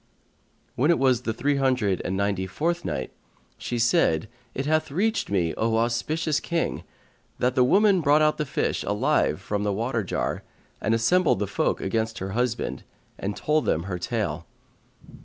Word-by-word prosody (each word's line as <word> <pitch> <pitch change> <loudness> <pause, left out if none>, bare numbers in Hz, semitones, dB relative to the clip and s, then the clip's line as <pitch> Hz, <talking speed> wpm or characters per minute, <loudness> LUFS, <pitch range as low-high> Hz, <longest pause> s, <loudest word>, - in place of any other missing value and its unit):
When 140 +6 +1
it 170 - +5
was 130 -3 +3
the 120 - -2
Three 140 +5 0
Hundred 125 -9 +1
and 95 - -2
Ninety 100 -2 0
fourth 170 - -1
Night - - -3 0.5
She 120 - -3
said, 110 -6 +2 0.3
It 135 - -2
hath 155 +1 +1
reached 215 +10 0
me, 90 -5 +1
O 110 0 +1
auspicious 140 +7 0
King, 170 -1 -2 0.5
that 125 0 +1
the 125 - +4
woman 195 +6 +4
brought 150 +1 +4
out 155 0 +2
the 150 - 0
fish - - -1
alive - - +1
from 105 -1 -3
the 105 0 0
water 115 +2 -1
jar 90 - -2 0.4
and 110 - +2
assembled 170 - +3
the 105 - -1
folk 100 - -1
against 110 +3 -1
her 95 +1 -4
husband, 120 +2 -1 0.4
and 100 +1 -3
told 155 0 +1
them 80 - +1
her 90 -1 -4
tale. 100 -6 -3
120 Hz, 170 wpm, -25 LUFS, 100-150 Hz, 0.5 s, it